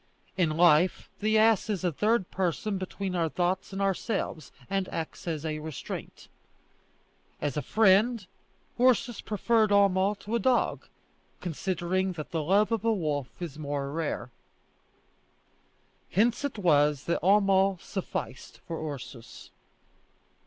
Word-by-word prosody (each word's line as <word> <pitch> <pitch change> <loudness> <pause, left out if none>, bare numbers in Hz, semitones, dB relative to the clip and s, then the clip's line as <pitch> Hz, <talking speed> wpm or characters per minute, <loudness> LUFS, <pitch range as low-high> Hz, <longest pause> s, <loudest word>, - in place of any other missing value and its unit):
In 165 -4 +1
life 175 +1 +4
the 215 +1 +2
ass 220 -1 +4
is 200 -4 -2
a 175 - +1
third 210 +4 +1
person 190 +2 -1
between 190 0 -4
our 165 -2 +1
thoughts 180 +5 -1
and 195 - -5
ourselves, 195 -4 -2 0.2
and 195 -1 -1
acts 165 +2 -6
as 160 -2 -3
a 155 -1 -2
restraint. 155 -2 -7 1.1
As 145 -3 -2
a 150 - -1
friend, 215 - +3 0.5
Ursus 245 -2 +3
preferred 220 +1 +1
Homo 200 0 +3
to 205 +2 -8
a 235 - +2
dog, 250 +3 +1 0.5
considering 185 +2 -1
that 155 -1 -7
the 165 -2 -1
love 200 +8 +2
of 225 -2 0
a 230 - +3
wolf 150 - -2
is 160 -4 -6
more 140 -2 -3
rare. 150 -6 -3 1.8
Hence 230 - +2
it 285 -5 -3
was 150 -6 +3
that 170 - -1
Homo 195 0 +4
sufficed 185 -9 -6
for 160 -2 -4
Ursus. 125 -2 -11
185 Hz, 130 wpm, -28 LUFS, 160-210 Hz, 1.8 s, life